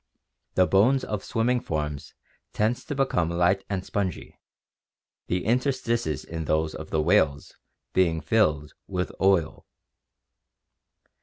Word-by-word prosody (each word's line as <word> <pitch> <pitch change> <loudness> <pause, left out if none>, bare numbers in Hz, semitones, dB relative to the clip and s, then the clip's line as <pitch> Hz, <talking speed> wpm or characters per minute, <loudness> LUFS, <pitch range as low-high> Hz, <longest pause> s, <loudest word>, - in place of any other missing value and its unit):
The 95 - +5
bones 120 +9 +3
of 105 -2 -4
swimming 120 +2 +1
forms 75 -6 -4 0.4
tend 110 +3 +1
to 145 - -6
become 135 -12 +1
light 90 +3 +2
and 95 -2 -3
spongy, 95 -5 -4 0.9
the 90 +1 -1
interstices 120 - 0
in 80 -1 -5
those 80 +1 0
of - - -8
the 80 -1 +1
whales 75 -3 +2 0.4
being 85 -3 +2
filled 75 -9 +1
with 90 -1 -2
oil. 95 -5 +2
95 Hz, 120 wpm, -26 LUFS, 80-115 Hz, 0.9 s, The